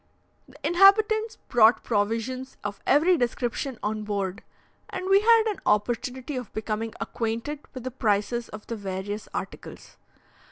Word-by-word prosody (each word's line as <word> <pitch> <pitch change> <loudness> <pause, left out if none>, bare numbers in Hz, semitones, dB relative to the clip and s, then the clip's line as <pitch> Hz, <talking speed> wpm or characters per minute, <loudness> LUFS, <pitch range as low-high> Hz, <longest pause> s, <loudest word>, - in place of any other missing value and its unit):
The 265 - -19
inhabitants 425 +6 +5
brought 230 -1 +5
provisions 230 +5 -2
of 205 -1 -4
every 330 +6 +5
description 245 0 -2
on 215 +1 -1
board, 200 -3 -3 0.5
and 370 - -5
we 390 +1 +6
had 455 +1 +6
an 425 -3 -2
opportunity 245 +6 0
of 250 -4 -6
becoming 220 +1 -3
acquainted 230 +6 -3 0.2
with 255 - -6
the 255 - -4
prices 230 0 0
of 215 0 -9
the 230 - -4
various 200 +1 -5
articles. - - -7
240 Hz, 135 wpm, -26 LUFS, 215-295 Hz, 0.5 s, we